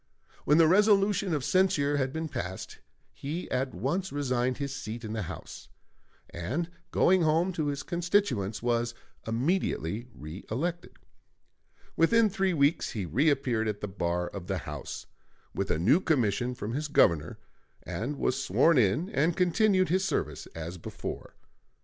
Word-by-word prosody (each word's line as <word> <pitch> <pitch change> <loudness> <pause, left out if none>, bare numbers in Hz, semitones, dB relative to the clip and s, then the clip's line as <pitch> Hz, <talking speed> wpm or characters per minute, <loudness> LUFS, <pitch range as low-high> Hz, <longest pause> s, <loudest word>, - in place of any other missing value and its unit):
When 150 - +5
the 165 -1 +6
resolution 200 +1 +4
of 150 -4 0
censure 150 -5 +2
had 130 -1 0
been 160 +2 -3
passed, 95 - -6 0.3
he 160 +6 -5
at 130 -3 -1
once 165 - -2
resigned 130 -3 0
his 140 -2 -3
seat 115 0 -6
in 110 - -5
the 110 - -2
House, 90 - -8 0.6
and 135 - -3 0.2
going 185 0 +4
home 165 +4 +2
to 155 -3 -1
his 140 -1 -2
constituents, 170 - 0
was 120 -1 0 0.3
immediately 115 - -1
reëlected. 115 - -4 1.0
Within 220 +6 +4
three 190 -2 +1
weeks 145 +2 +2
he 100 -5 -3
reappeared 130 - +1
at 105 -1 -3
the 105 - -2
bar 90 -2 -2
of 95 -3 -8
the 95 - -1
House, 75 -2 -6 0.5
with - - -2
a - - +1
new 115 - +4
commission 125 - +1
from 110 -1 -5
his 150 +3 -2
Governor, 85 - +3 0.5
and 135 +7 -4
was 135 +1 0
sworn 165 -4 +4
in 125 - +2
and 160 +4 +1
continued 185 +1 +3
his 185 +3 +2
service 190 - -2
as 85 +2 -6
before. - - -7
140 Hz, 150 wpm, -29 LUFS, 110-175 Hz, 1.0 s, the